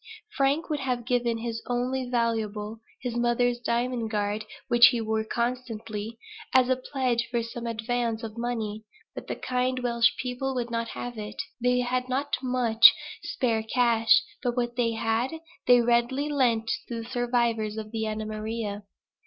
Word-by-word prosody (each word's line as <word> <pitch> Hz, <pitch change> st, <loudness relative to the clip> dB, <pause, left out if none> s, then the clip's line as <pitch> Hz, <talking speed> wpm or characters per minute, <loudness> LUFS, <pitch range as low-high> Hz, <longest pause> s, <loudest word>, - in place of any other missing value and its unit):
Frank 280 Hz, +3 st, +2 dB
would 300 Hz, -2 st, -1 dB
have 250 Hz, -3 st, -2 dB
given 240 Hz, -2 st, +1 dB
his 230 Hz, 0 st, -4 dB
only 250 Hz, +1 st, -1 dB
valuable, 220 Hz, -2 st, -1 dB, 0.2 s
(his 245 Hz, -2 st, -3 dB
mother's 240 Hz, 0 st, +2 dB
diamond 240 Hz, -1 st, -1 dB
guard, 210 Hz, 0 st, -1 dB, 0.2 s
which 240 Hz, +1 st, +8 dB
he 245 Hz, -, +1 dB
wore 220 Hz, 0 st, 0 dB
constantly,) 230 Hz, -2 st, -3 dB, 0.4 s
as 255 Hz, -1 st, +6 dB
a 260 Hz, -, +4 dB
pledge 255 Hz, -3 st, -1 dB
for 235 Hz, -1 st, 0 dB
some 235 Hz, +1 st, -6 dB
advance 230 Hz, 0 st, -1 dB
of 220 Hz, -1 st, -6 dB
money; 225 Hz, -3 st, -3 dB, 0.3 s
but -, -, -8 dB
the -, -, -3 dB
kind 255 Hz, 0 st, -1 dB
Welsh 235 Hz, -1 st, +3 dB
people 265 Hz, +1 st, -3 dB
would 240 Hz, -1 st, -2 dB
not 230 Hz, 0 st, -1 dB
have 240 Hz, -1 st, -6 dB
it. 210 Hz, 0 st, -7 dB, 0.2 s
They 250 Hz, +1 st, +3 dB
had 250 Hz, +1 st, -1 dB
not 275 Hz, +3 st, 0 dB
much 240 Hz, -3 st, +6 dB, 0.3 s
spare 230 Hz, -4 st, 0 dB
cash, 230 Hz, 0 st, +4 dB, 0.2 s
but 245 Hz, 0 st, -1 dB
what 240 Hz, -1 st, -1 dB
they 235 Hz, -2 st, +1 dB
had 225 Hz, +4 st, 0 dB, 0.3 s
they 245 Hz, -1 st, +7 dB
readily 240 Hz, +5 st, +1 dB
lent 235 Hz, -6 st, +2 dB, 0.2 s
to 230 Hz, -1 st, -4 dB
the -, -, -10 dB
survivors 235 Hz, -3 st, 0 dB
of 215 Hz, -1 st, -6 dB
the 220 Hz, -1 st, -2 dB
Anna 215 Hz, 0 st, -3 dB
Maria. 215 Hz, -1 st, -4 dB
235 Hz, 160 wpm, -27 LUFS, 225-250 Hz, 0.4 s, which